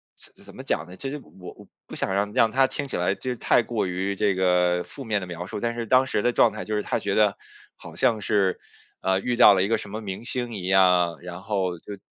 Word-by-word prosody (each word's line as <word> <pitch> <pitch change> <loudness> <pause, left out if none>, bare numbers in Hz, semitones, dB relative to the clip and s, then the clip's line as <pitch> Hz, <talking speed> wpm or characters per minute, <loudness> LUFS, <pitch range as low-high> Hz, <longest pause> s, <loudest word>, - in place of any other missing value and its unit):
怎 - - -9
怎 - - -13
么 - - -8
讲 75 - -1
呢？ 90 - -11
其 135 +8 -5
实 150 - -5 0.2
我 90 - -9
我 - - -15 0.2
不 - - -9
想 95 - -1
让 100 +1 0
让 115 0 +4
他 135 +2 +4
听 140 - -4
起 - - -2
来 90 +2 +1
就 125 - -3
太 120 - +3
过 115 -2 -2
于 95 +2 -2
这 100 -1 +1
个 90 -1 +2
负 140 - -10
面 110 -4 -1
的 90 - -6
描 90 0 -6
述。 95 - -6
但 115 +2 -2
是 120 -1 -3
当 130 +3 +4
时 105 - 0
的 120 - +3
状 115 - +4
态 110 - -7
就 110 - -2
是 105 - 0
他 - - -1
觉 100 - -2
得 105 -2 +3 0.4
好 - - -12
像 120 -4 +2
是， 100 -2 +1 0.4
呃， 95 0 +1
遇 125 +4 -1
到 115 -4 +8
了 95 - +2
一 100 - 0
个 115 - +1
什 105 - -8
么 110 +2 -5
明 100 +1 -6
星 120 -2 -1
一 90 - -6
样， 90 -3 +3
然 90 +1 -8
后 95 -3 -2
就 100 +4 -9
100 Hz, 285 characters per minute, -25 LUFS, 95-115 Hz, 0.4 s, 到